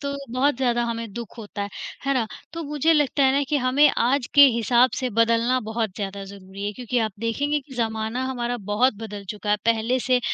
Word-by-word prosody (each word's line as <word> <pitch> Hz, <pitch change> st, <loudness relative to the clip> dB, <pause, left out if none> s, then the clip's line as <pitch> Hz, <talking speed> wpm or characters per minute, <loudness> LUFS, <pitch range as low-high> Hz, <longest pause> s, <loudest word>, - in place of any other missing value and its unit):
तो 280 Hz, 0 st, -3 dB, 0.2 s
बहुत 265 Hz, +2 st, +2 dB
ज़्यादा 240 Hz, -2 st, +1 dB
हमें 230 Hz, -2 st, -4 dB
दुःख 235 Hz, +1 st, -8 dB
होता 205 Hz, -2 st, -6 dB
है, 200 Hz, -, -4 dB, 0.4 s
है 275 Hz, -, +2 dB
ना? 240 Hz, -4 st, +1 dB, 0.3 s
तो 330 Hz, 0 st, -5 dB
मुझे 300 Hz, +2 st, +2 dB
लगता 295 Hz, -2 st, +2 dB
है 265 Hz, -, +4 dB
ना 280 Hz, +1 st, +2 dB
कि 295 Hz, -, +1 dB
हमें 270 Hz, +3 st, +4 dB
आज 250 Hz, +2 st, +1 dB
के 285 Hz, -, +9 dB
हिसाब 240 Hz, +2 st, +3 dB
से 255 Hz, -, -1 dB
बदलना 230 Hz, +3 st, +2 dB
बहुत 220 Hz, -1 st, -2 dB
ज़्यादा 200 Hz, -1 st, -5 dB
ज़रूरी 195 Hz, 0 st, -9 dB
है, 205 Hz, -, -2 dB
क्योंकि 245 Hz, +2 st, -2 dB
आप 215 Hz, -, -8 dB
देखेंगे 285 Hz, +6 st, 0 dB
कि 265 Hz, -1 st, -14 dB
ज़माना 225 Hz, +1 st, -2 dB
हमारा 245 Hz, -2 st, -2 dB
बहुत 245 Hz, +5 st, +3 dB
बदल 205 Hz, -2 st, -7 dB
चुका 210 Hz, -1 st, -4 dB
है 210 Hz, -, +4 dB
पहले 230 Hz, +2 st, +1 dB
से 250 Hz, 0 st, +2 dB
240 Hz, 215 wpm, -23 LUFS, 220-265 Hz, 0.4 s, के